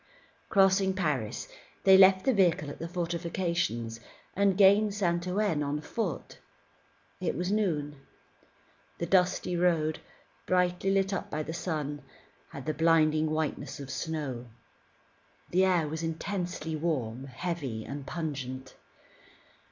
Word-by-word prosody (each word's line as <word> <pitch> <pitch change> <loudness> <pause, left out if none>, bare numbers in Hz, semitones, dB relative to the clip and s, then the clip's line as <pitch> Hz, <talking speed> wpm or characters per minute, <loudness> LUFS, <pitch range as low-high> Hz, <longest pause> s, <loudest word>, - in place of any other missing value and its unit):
Crossing 195 -1 +4
Paris, 145 - -2 0.4
they 190 -1 +8
left 190 0 +7
the 265 - +4
vehicle 170 -7 +2
at - - -10
the 165 - -4
fortifications, 170 - -2 0.4
and 195 -1 +3
gained 200 +1 +5
Saint 175 -3 0
Ouen 185 -4 +1
on 145 +1 -1
foot. 180 +1 -4 0.8
It - - -1
was 180 +3 -1
noon. 155 -9 0 1.0
The 170 - -2
dusty 180 0 +2
road, 165 -3 +1 0.5
brightly 180 +1 +1
lit 195 0 +2
up 195 - -3
by 155 - -2
the 160 - -5
sun, 150 -4 -3 0.5
had 140 - -9
the 155 - -1
blinding 155 -1 +3
whiteness 155 -2 -3
of 135 -1 -7
snow. 135 -4 -4 1.0
The 185 +2 +4
air 175 -4 +2
was 160 +2 -4
intensely 165 -1 -3
warm, 135 -6 -2
heavy 135 -5 -4
and 140 0 -6
pungent. 135 -6 -5
165 Hz, 125 wpm, -29 LUFS, 150-185 Hz, 1.0 s, they